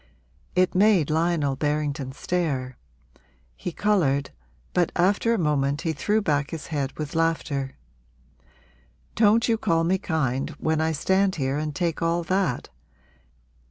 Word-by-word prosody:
It 185 0 +3
made 185 -6 +4
Lionel 160 -3 +1
Berrington 145 -1 -1
stare; 135 -7 -2 0.8
he 180 - -5
coloured, 155 -9 +1 0.4
but 175 -2 +2
after 200 +6 +2
a 230 - +2
moment 145 -4 0
he 160 - -1
threw 210 +8 0
back 145 -5 0
his 160 -3 -6
head 140 -2 -1
with 150 -1 -5
laughter. 160 -4 -1 1.4
'Don't 225 +1 +4
you 225 -2 +1
call 165 -4 +1
me 185 +3 +1
kind 145 -7 -1
when 160 0 0
I 160 0 +1
stand 190 +5 +1
here 135 -1 -1
and 150 -1 -3
take 170 -1 -1
all 170 +1 +1
that? 185 -7 -1
160 Hz, 135 wpm, -25 LUFS, 145-180 Hz, 1.4 s, made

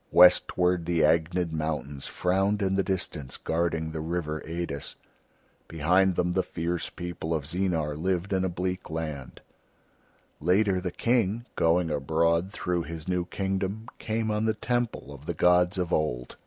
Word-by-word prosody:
Westward 90 -1 +5
the 85 -2 +2
Agnid 85 +2 +2
mountains 75 -3 -3
frowned 95 +3 +1
in 95 0 +1
the 95 - +3
distance 80 -8 -3
guarding 80 -1 -1
the 80 - -4
river 80 -1 -2
Eidis; 85 -3 -4 0.7
behind 90 +4 +3
them 90 +1 +1
the 95 - +2
fierce 85 -1 -3
people 85 -2 -4
of 75 - -2
Zeenar 80 -3 -1
lived 95 +4 -1
in 95 -1 +2
a 95 - +1
bleak 90 +1 -3
land. 80 -4 -5 1.0
Later 95 +2 +2
the 90 - -2
King, 115 +2 +1
going 85 0 +2
abroad 85 +5 +1
through 90 -3 -1
his 80 -1 -7
new 90 -1 0
kingdom, 95 +4 -2
came 110 0 -1
on 105 +1 0
the 110 0 +1
Temple 120 - -2
of 70 +1 -13
the 85 - -2
gods 90 +3 +4
of 90 -2 -1
Old. 60 -6 -1
90 Hz, 155 wpm, -27 LUFS, 80-95 Hz, 1.0 s, Westward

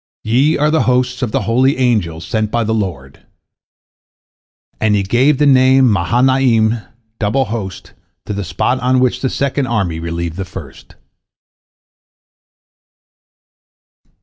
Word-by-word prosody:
Ye 130 +8 +2
are 150 +1 +1
the 160 - +2
hosts 125 0 0
of 120 -4 -2
the - - 0
holy 130 +4 +2
angels 100 -11 0
sent 110 +5 -1
by 120 +1 0
the 110 +1 -1
Lord." 85 -11 -4 1.6
And 105 -1 +2
he 100 - +1
gave 130 +8 +2
the 150 - +2
name 130 -2 +5
Mahanaim, 120 +3 +2 0.4
Double 120 +6 0
Host, 105 -6 -6 0.3
to - - -4
the 100 0 -3
spot 90 +8 -1
on 130 +1 +1
which 125 0 0
the 130 - 0
second 140 0 -1
army 95 -8 -1
relieved 85 0 -4
the 95 - -3
first. 90 - -11
115 Hz, 130 wpm, -16 LUFS, 100-130 Hz, 1.6 s, name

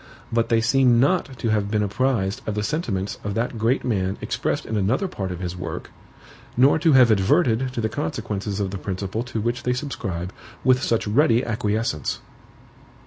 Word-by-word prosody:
But 115 0 +1
they 115 -1 +3
seem 125 0 +4
not 140 -1 +1
to 115 - -1
have 105 -2 +1
been 105 0 +1
apprised 105 -2 0
of 105 - -1
the 105 - -1
sentiments 105 - -2
of 100 -1 -3
that 115 0 -2
great 115 +5 +1
man 95 -5 0
expressed - - -2
in 110 - -3
another 110 - +1
part 95 - -4
of 90 0 -6
his 90 -1 -4
work, 90 - -6 0.7
nor 135 +5 +5
to 160 -2 +4
have 125 -3 +7
adverted 115 - +2
to 120 - -2
the 110 - +1
consequences 100 0 -3
of 100 -2 -1
the 100 - -5
principle 95 +3 -3
to 120 -2 -4
which 120 +3 -1
they 125 - 0
subscribe 100 - -4 0.3
with 130 0 +4
such 115 -3 +1
ready 120 +2 +3
acquiescence. 110 - -1
110 Hz, 185 wpm, -23 LUFS, 100-125 Hz, 0.7 s, have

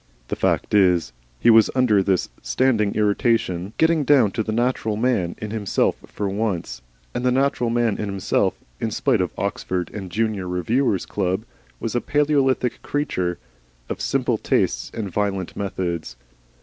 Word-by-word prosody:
The - - -1
fact - - 0
is, 90 -9 +3 0.3
he 120 - +5
was, 110 -1 +6
under 120 -6 +4
this 95 -1 +1
standing 105 - +1
irritation, 105 -3 +1
getting 160 -1 +3
down 130 -7 +4
to 110 - -1
the 110 - -3
natural 115 -2 0
man 110 -8 0
in 105 -1 -6
himself 105 -3 +1
for 100 - -3
once, 95 - -2 0.3
and - - -3
the 125 - +3
natural 130 -2 +1
man 115 -2 +1
in 105 - -2
himself, 95 -1 0 0.2
in 115 - -1
spite 115 0 +1
of 90 - -1
Oxford 95 -2 -2
and 105 -3 -5
the - - -17
junior 110 -4 0
Reviewers' 95 +4 0
Club, 95 +2 -1 0.3
was 115 - -3
a 120 - +1
Palaeolithic 140 -4 +1
creature 95 - -1 0.5
of - - -4
simple - - 0
tastes - - 0
and 110 -3 -4
violent 95 -1 -2
methods. 85 -8 -3
105 Hz, 160 wpm, -22 LUFS, 95-120 Hz, 0.5 s, was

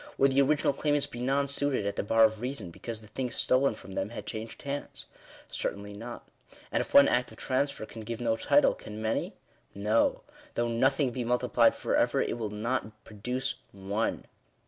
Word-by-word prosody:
Would 135 0 +4
the 135 +1 +4
original 145 +1 +3
claimants 145 0 +1
be 120 - -9
nonsuited 140 -2 +1
at 100 0 -1
the - - 0
bar 115 +2 +4
of 110 0 +3
reason, 125 -8 -4
because 115 +5 -6
the 105 - -14
thing 125 +4 -3
stolen 130 0 +2
from 100 - -12
them 95 +1 -2
had 120 - -7
changed 110 0 -6
hands? 140 0 -5 0.4
Certainly 100 +1 -4
not. 115 +4 -8 0.4
And - - +2
if - - -6
one 140 - +9
act 125 0 +1
of - - -13
transfer 135 -3 -1
can 110 +1 -9
give 115 +1 -5
no 115 -2 +1
title, - - +4
can 105 0 -9
many? 110 +1 -1 0.4
No: 105 +3 +2 0.3
though 120 0 +1
nothing 130 +3 +2
be 125 0 -3
multiplied 120 +1 +3
for - - -1
ever, - - +3
it - - -1
will 110 -2 -2
not 110 0 -3
produce 125 +6 -3 0.2
one. 100 +3 -2
115 Hz, 190 wpm, -29 LUFS, 110-135 Hz, 0.4 s, one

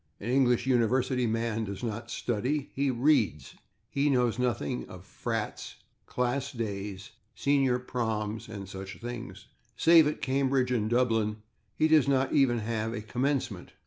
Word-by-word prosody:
An 115 +4 -3
English 125 -3 +3
university 125 0 +2
man 115 0 -1
does 100 +1 -6
not 115 0 -4
/study/; 130 +6 -2
he 140 0 0
/reads/. 120 - +1 0.3
He 140 +1 +1
knows 125 -3 +2
nothing 100 - -1
of - - -11
/frats/, - - -4 0.3
/class 125 +1 -2
days/, 100 -2 -4 0.3
/senior 135 -3 +2
proms/ 110 -3 -2
and 100 -3 -7
such 95 +1 -8
things; 120 0 -7 0.3
save 165 -2 +6
at 150 - -2
Cambridge 130 -1 +1
and 110 -3 0
Dublin 115 -3 +1 0.3
he 155 - +3
does 155 -3 +5
not 135 -1 +2
even 135 -5 +4
have 110 0 -2
a 110 - -4
/commencement 120 -3 -2
120 Hz, 145 wpm, -29 LUFS, 110-130 Hz, 0.3 s, save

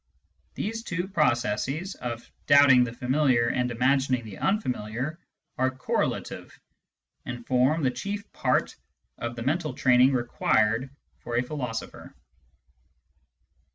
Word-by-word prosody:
These 225 +2 -3
two 180 -4 -3
processes, 150 - 0
of 120 -1 -6 0.2
doubting 140 -3 +7
the 125 - -3
familiar 125 -1 +2
and 125 0 0
imagining 130 0 +1
the 105 -3 -9
unfamiliar, 130 - -2 0.4
are 130 0 +3
correlative, 130 0 -3 0.6
and 120 -2 -7
form 130 +5 +2
the 130 - +2
chief 200 +11 -5
part - - 0 0.4
of 115 0 -4
the 120 - -5
mental 150 0 -1
training 125 +1 +4
required 120 0 +1 0.3
for 120 - -5
a 120 - +2
philosopher. 125 -4 -6
130 Hz, 115 wpm, -26 LUFS, 120-150 Hz, 0.6 s, doubting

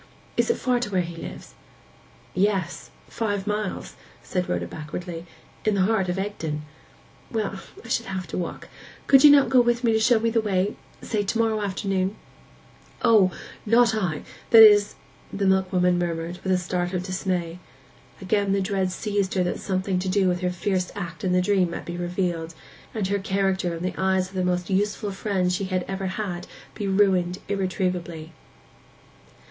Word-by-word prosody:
Is - - +1
it 465 - +3
far 250 -1 +1
to 240 - -3
where 185 -3 +1
he 170 0 -7
lives?' 165 - -9 0.8
'Yes—five 200 +2 -2
miles,' 210 -2 -3 0.3
said 180 -2 -2
Rhoda 85 0 -1
backwardly. 165 - -7 0.4
'In 215 -1 +2
the 190 - +3
heart 195 -2 +1
of 180 - -1
Egdon.' 160 -7 -3 0.7
'Well, 210 -3 -2 0.3
I - - -9
should - - -1
have 190 -1 -4
to - - -4
walk. 175 - -5 0.4
Could 270 -1 +6
not 290 -1 +9
you - - -4
go 255 -2 +7
with 240 0 +1
me 230 -2 +3
to 220 - +3
show 225 +1 +4
me 230 +1 0
the 225 0 +2
way—say 205 +1 -2
to 205 +3 -2
morrow 225 -2 +1
afternoon?' 195 -1 -1 0.9
'O, 210 -5 +6 0.3
not 230 +1 +4
I—that 215 +3 +4
is,' 205 -1 +6 0.4
the 200 0 -1
milkwoman 185 -2 +2
murmured, 170 0 -3
with 190 - 0
a 185 - +4
start 180 0 -2
of 180 -1 -1
dismay. 180 -2 -2 0.6
Again 200 +1 +1
the 200 - +2
dread 190 -1 0
seized 200 0 -1
her 185 - +2
that 180 - -2
something 190 -1 -1
to 185 +1 -2
do 190 0 +2
with 180 -1 +1
her 180 - +1
fierce 180 +1 -1
act 175 -4 -6
in 185 - +1
the 180 0 +3
dream 190 -2 +2
might 170 - -6
be 175 - -5
revealed, 175 -2 -2 0.4
and 215 -3 -1
her 200 0 +1
character 190 -2 0
in 165 - -6
the 185 - -1
eyes 190 -1 +1
of - - -19
the 185 -1 -1
most 180 -1 0
useful 205 +1 0
friend 190 -2 0
she 195 +2 -1
had 185 -1 -1
ever 195 0 -3
had 185 -2 -4 0.3
be 205 -2 -4
ruined 190 -2 +2
irretrievably. 180 -4 -2
190 Hz, 175 wpm, -25 LUFS, 180-205 Hz, 0.9 s, not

